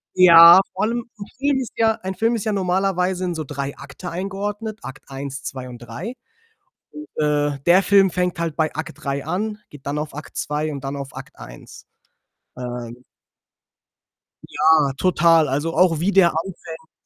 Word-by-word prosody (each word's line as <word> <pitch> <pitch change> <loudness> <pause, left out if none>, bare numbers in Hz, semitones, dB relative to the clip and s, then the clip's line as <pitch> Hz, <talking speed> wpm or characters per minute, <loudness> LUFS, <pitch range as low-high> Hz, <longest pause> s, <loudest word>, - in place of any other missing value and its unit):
Ja, 170 0 +9
vor 190 - -2
allem, 235 +1 -2 0.2
'n 200 - -6
Film 280 0 +1
ist 250 - -6
ja 225 -1 +3
ein 190 0 -5
Film 230 +3 +1
ist 220 - -4
ja 215 - 0
normalerweise 185 -1 0
in 175 -2 -3
so 155 - -3
3 140 -1 -5
Akte 140 +6 -9
eingeordnet, 205 +4 -4
Akt 135 0 -9
1, 135 0 -7
2 130 -3 -6
und 120 -1 -10
3. 120 - -7 0.8
und, 300 +1 -9 0.2
äh, 145 -1 0
der 180 +3 +6
Film 195 -1 +4
fängt 180 0 -2
halt 165 -3 -3
bei 155 -2 0
Akt 155 -1 -7
3 140 0 -2
an, 210 +5 -3
geht 145 -2 -15
dann 145 +1 -2
auf 150 -1 -5
Akt 150 +1 -10
2 150 +1 -2
und 140 -2 -7
dann 135 +1 -4
auf 140 -1 -7
Akt - - -11
1. - - -12 0.7
Ähm 120 -1 -7 1.4
Ja, 155 -2 +3
total. 165 -2 +3
Also, 145 +5 -2
auch 170 -3 +3
wie 185 +4 +1
der 185 -3 +5
anfängt, 165 -1 -7
165 Hz, 175 wpm, -21 LUFS, 140-190 Hz, 1.4 s, Ja